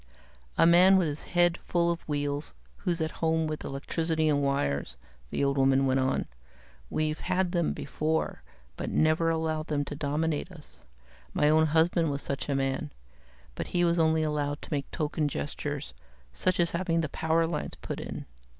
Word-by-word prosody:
"A - - +6
man 180 +3 +7
with 180 -3 +2
his 150 0 -4 0.2
head 175 0 +4
full 170 -1 +1
of 170 - -3
wheels, 145 0 -2 0.2
who's 175 -4 -1
at 160 -1 -1
home 160 0 +2
with 155 -1 -4
electricity 160 +3 -1
and 145 -1 +2
wires," 70 - -1 0.3
the - - -1
old 140 0 +1
woman 135 0 +4
went 130 0 +2
on. 130 0 +1 0.6
"We've 155 0 -1
had 185 0 0
them 170 -3 +1
before, 155 +3 -2 0.4
but - - -3
never 155 +1 +3
allowed 160 -1 -1
them 145 -2 0
to 145 - -6
dominate 150 +3 -1
us. 160 -5 -15 0.6
My 150 - +4
own 160 +1 +5
husband 165 +1 +3
was 140 0 -3
such 140 +1 -4
a 140 - +1
man, 135 +1 -1 0.6
but - - -4
he 175 - +4
was 170 0 +2
only 160 0 +3
allowed 145 -1 -1
to - - -6
make 140 -1 -2
token 150 0 -1
gestures, 70 - -4 0.4
such 185 -1 0
as 170 -1 +2
having 170 -1 0
the 155 - -1
power 160 +2 +1
lines 165 -2 -3
put - - -6
in. - - -6
155 Hz, 175 wpm, -28 LUFS, 145-165 Hz, 0.6 s, man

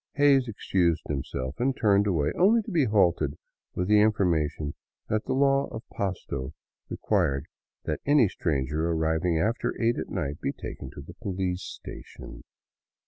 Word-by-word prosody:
Hays 140 -3 +4
excused 90 -6 0
himself 65 -2 -4
and 130 +2 +1
turned 105 -1 +3
away, 80 -7 +1
only 215 +5 +4
to 215 - -7
be 160 -6 +3
halted 90 - +2 0.4
with 90 - -1
the 105 0 +5
information 80 -8 +1 0.4
that 110 0 0
the 130 - -1
law 135 +1 +3
of 110 - -8
Pasto 85 -9 -4 0.3
required 70 +1 0 0.4
that - - -3
any 145 -5 +5
stranger 75 -2 -1
arriving 80 +1 +1
after 110 +8 -1
eight 115 0 +2
at - - -5
night 75 -7 -3
be - - -1
taken 65 - -7
to - - -7
the 80 +5 -11
police 95 -1 -3
station. - - -9
95 Hz, 150 wpm, -27 LUFS, 80-115 Hz, 0.4 s, the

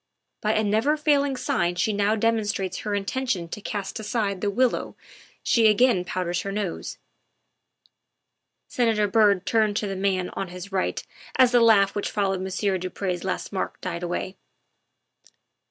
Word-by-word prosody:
By 215 0 +1
a 215 - +2
never 220 +9 +2
failing 285 -2 +2
sign 175 -8 0
she 195 +4 0
now 205 +1 +2
demonstrates 210 -4 0
her 210 -1 -2
intention 200 -3 -2
to 210 - -6
cast 200 +1 -4
aside 210 -3 -2
the 205 - +1
willow 250 +5 0 0.5
she 230 -2 +4
again 215 -3 +4
powders 180 -1 -2
her 195 - -4
nose." 200 -4 -4 1.7
Senator 225 -4 +1
Byrd 205 -3 +3
turned 215 -2 +2
to 215 - -1
the 195 -1 -3
man 190 -1 0
on 195 - -4
his 180 +2 -9
right 190 -1 -1 0.3
as 255 -2 +6
the 245 - +5
laugh 205 -4 +5
which 205 - -2
followed 195 -2 -1
Monsieur 190 0 -1
du 185 +1 -4
Pre's 180 -2 -3
last 190 - -3
remark 190 - -3
died 175 -2 -4
away. 180 +2 -4
205 Hz, 155 wpm, -25 LUFS, 185-220 Hz, 1.7 s, as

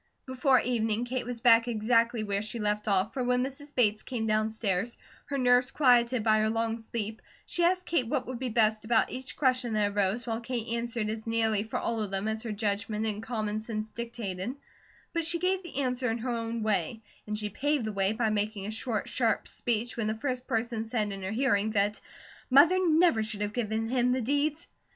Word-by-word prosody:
Before 260 0 +3
evening 225 -1 0
Kate 250 -1 -3
was 245 -2 -5
back 230 -1 +6
exactly 230 0 +2
where 200 -1 -1
she 215 +2 -5
left 210 -1 -1
off, 195 0 +2
for 260 -2 -2
when 250 0 +2
Mrs. 285 +2 -7
Bates 215 -4 +3
came 240 -4 -3
downstairs, 215 -1 0 0.3
her 285 -1 -3
nerves 250 0 +4
quieted 245 -4 +3
by 215 -1 +4
her 215 0 +2
long 225 0 -1
sleep, 225 0 -5 0.2
she 350 - -1
asked 365 +1 +2
Kate 260 -9 +1
what - - -1
would 250 -2 -5
be 255 -1 -2
best 220 -1 +2
about 220 0 +2
each 260 +1 -7
question 255 -4 +1
that 210 -1 +1
arose, 205 +3 0
while 225 -2 -2
Kate 235 -1 -3
answered 235 -2 -2
as 220 +1 -5
nearly 225 -2 +2
for 220 +1 -4
all 230 -1 -1
of 210 - -2
them 195 +2 -2
as 220 0 -2
her 230 -2 -4
judgment 210 +1 -1
and 210 -1 -2
common 215 -2 -2
sense 215 -1 -5
dictated; 230 -2 -5 0.6
but 335 -1 0
she 340 +2 +2
gave 370 +2 0
the 345 -7 -9
answer 250 -1 0
in 225 - -1
her 245 +2 -3
own 230 -1 -3
way, 215 +1 -1 0.2
and 210 0 -2
she 210 -1 -3
paved 290 +1 0
the 215 - -2
way 195 0 +1
by 220 0 0
making 210 -1 -1
a 210 - -3
short, 220 -1 -2
sharp 230 -3 0
speech 235 0 -2
when 225 -2 -1
the 215 - -1
first 250 +2 -3
person 230 -2 -1
said 220 -2 -2
in 195 0 -6
her 190 - -3
hearing 220 -2 +1
that 210 0 +1 0.5
"Mother 310 +8 +6
never 315 -7 +4
should 215 -1 -4
have 210 0 -2
given 225 -1 -1
him 250 0 +2
the 255 - 0
deeds." 290 +6 0
225 Hz, 210 wpm, -29 LUFS, 215-250 Hz, 0.6 s, back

